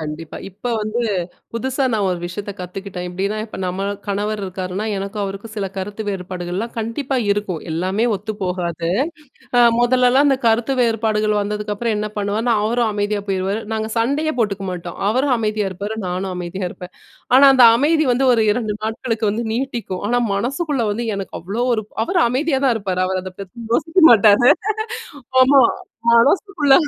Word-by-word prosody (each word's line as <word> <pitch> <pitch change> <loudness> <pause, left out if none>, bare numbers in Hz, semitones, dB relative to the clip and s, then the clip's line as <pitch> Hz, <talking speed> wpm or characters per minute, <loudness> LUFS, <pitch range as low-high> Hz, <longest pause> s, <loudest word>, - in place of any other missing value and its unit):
கண்டிப்பா, 155 +1 -6
இப்ப 200 +6 -7
வந்து 215 +3 -2 0.5
புதுசா 260 +4 -1
நான் 210 -3 +1
ஒரு 180 -1 -1
விஷயத்த 200 +4 -5
கத்துக்கிட்டேன். 180 0 -6
எப்டின்னா 195 +4 -2
இப்ப 220 - -9
நம்ம 185 +1 -2 0.2
கணவர் 205 +1 -2
இருக்காருன்னா 185 +1 -4
எனக்கும் 200 +2 -4
அவருக்கும் 195 +3 -7
சில 200 -2 -1
கருத்து 205 +3 -4
வேறுபாடுகள்லாம் 185 +2 -4
கண்டிப்பா 245 +5 -2 0.2
இருக்கும், 200 -5 -3
எல்லாமே 185 +7 0
ஒத்துப்போகாது. 180 -5 -3 0.7
அ - - +7 0.2
முதல்லலாம் 250 +3 +4
அந்த 270 -2 +3
கருத்து 230 +4 +2
வேறுபாடுகள் 215 -2 +1
வந்ததுக்கப்புறம் 210 +2 -2
என்ன 210 0 -2
பண்ணுவாருன்னா, 215 +4 0
அவரும் 230 +1 +1
அமைதியா 205 0 -1
போயிருவாரு, 195 +3 -1
நாங்க 220 0 -2
சண்டையே 285 +7 +1
போட்டுக்கமாட்டோம். 190 -5 -3
அவரும் 255 +4 +2
அமைதியா 215 -2 -1
இருப்பாரு, 205 +4 -5
நானும் 185 +1 -3
அமைதியா 180 +2 -4
இருப்பேன். 180 0 -11 0.4
ஆனா 275 +2 +8
அந்த 250 -2 +8
அமைதி 310 +4 +2
வந்து 255 +2 +2
ஒரு 230 - +3
2 215 -2 -1
நாட்களுக்கு 225 0 -1
வந்து 230 +3 -3
நீட்டிக்கும். 235 -7 -3
ஆனா 245 +2 +2 0.2
மனசுக்குள்ள 275 - -1
வந்து 235 +3 -3
எனக்கு 195 -3 -6
அவ்ளோ 200 +8 -2
ஒரு 220 - -2 0.2
அவரு 355 +8 +1
அமைதியா 270 +3 0
தான் 250 -3 +3
இருப்பாரு, 190 -3 -3
அவரு 185 0 -1
அதப்பத்தி 195 +5 -9
யோசிக்க 325 +7 +2
மாட்டாரு. 220 +2 +6 0.9
ஆமா 270 +1 +6 0.5
மனசுக்குள்ள, 295 - +3
215 Hz, 150 wpm, -20 LUFS, 195-240 Hz, 0.9 s, ஆனா